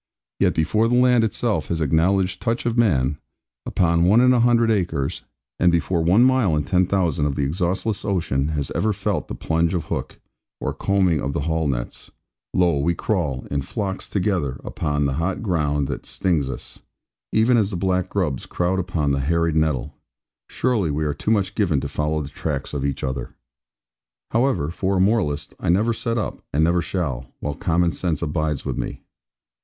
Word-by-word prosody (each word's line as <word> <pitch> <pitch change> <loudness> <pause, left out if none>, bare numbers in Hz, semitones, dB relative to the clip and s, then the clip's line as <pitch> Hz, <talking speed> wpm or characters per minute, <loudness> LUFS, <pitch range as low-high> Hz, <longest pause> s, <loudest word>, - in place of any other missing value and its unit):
Yet - - +2
before 105 +8 +2
the 120 +1 +2
land 125 -2 +5
itself 110 -6 0
has 85 - -2
acknowledged 90 +5 +1
touch 115 0 -1
of 120 -1 0
man, 75 - +2 0.5
upon 85 -1 +2
one 105 +6 +5
in 125 +1 +5
a 125 - +3
hundred 115 -1 +4
acres; 90 -9 -1 0.4
and 90 0 +4
before 85 +1 +1
one 90 +8 +4
mile 130 -10 +3
in 75 - 0
ten 95 -2 +2
thousand 85 -7 +1
of 70 - -2
the 70 - 0
exhaustless 90 +7 -1
ocean 80 -8 0
has 75 -3 -3
ever 110 0 +1
felt - - -2
the - - -5
plunge 85 +2 0
of 85 - -2
hook, - - -4 0.4
or - - -2
combing 95 -6 +1
of 70 - -2
the - - -1
haul 80 +1 0
nets; - - -4 0.4
lo, 85 -5 +2
we 85 +5 +1
crawl, 80 - -1
in 70 0 0
flocks 95 - -4
together 90 -10 -1
upon 75 -1 -1
the 70 - 0
hot 90 +5 -2
ground 75 -7 0
that 65 - -5
stings 80 -8 0
us, 65 - -8 0.5
even 115 +3 +4
as 105 -4 +2
the 95 - -3
black 95 0 0
grubs 80 -10 -2
crowd 90 +2 0
upon 85 -5 -1
the 70 - +1
harried 85 +3 +1
nettle! 75 -6 0 0.6
Surely 115 -10 0
we 75 +1 -1
are 75 - 0
too - - -4
much 100 -3 +2
given 90 -10 +1
to 70 - -4
follow 75 +2 -1
the 70 - -7
tracks 70 -1 -4
of 70 -2 -2
each 70 -1 -2
other. 65 0 -4 1.0
However, 115 - +1
for 95 +2 -1
a - - +1
moralist, 95 - +1
I - - -2
never 105 +7 +3
set 115 0 -2
up, 110 - -3
and 75 +3 +2
never 85 +2 +3
shall, 65 -10 -3
while 75 - -3
common 85 0 +1
sense 85 -3 -2
abides 75 -2 -1
with - - -3
me. - - -5
85 Hz, 190 wpm, -22 LUFS, 75-100 Hz, 1.0 s, land